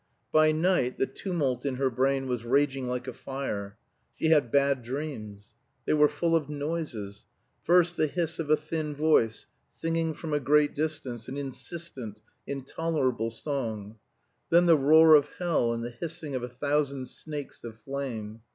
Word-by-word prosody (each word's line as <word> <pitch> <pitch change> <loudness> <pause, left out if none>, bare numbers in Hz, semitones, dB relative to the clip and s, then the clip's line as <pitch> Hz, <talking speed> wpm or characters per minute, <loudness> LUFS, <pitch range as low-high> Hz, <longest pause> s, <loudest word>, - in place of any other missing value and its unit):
By 155 0 +5
night 155 -5 +1
the - - +2
tumult 140 -9 -2
in 140 -2 -1
her 135 0 +1
brain 135 +2 +1
was 125 -2 -2
raging 135 +1 +1
like 125 0 -3
a 130 - -4
fire. 105 -7 -5 0.4
She 160 - +1
had 145 -7 +4
bad 140 -2 +3
dreams. 120 -5 -6 0.3
They - - +2
were 150 -1 +6
full 165 +3 +1
of 150 -3 0
noises. 145 -9 -4 0.4
First, 175 0 +4
the 155 - +3
hiss 170 +1 -2
of 155 -2 -3
a 155 - +5
thin 155 -1 -4
voice 145 -7 +2 0.3
singing 165 -1 -1
from 160 -3 -5
a 145 - +2
great 145 +2 +3
distance 140 -7 -3
an 135 +2 -5
insistent, 135 -5 -7 0.3
intolerable 135 -4 -1
song; 115 -4 -4 0.5
then 170 +1 +5
the 170 -2 +7
roar 155 +3 +7
of 145 -1 +6
hell, 170 -10 +1
and 115 0 -3
the 120 - -4
hissing 155 +2 -6
of 130 - -2
a 125 - -5
thousand 140 +1 -1
snakes 150 -3 -8
of 115 -2 -8
flame. 115 -3 -5
140 Hz, 165 wpm, -28 LUFS, 125-155 Hz, 0.5 s, the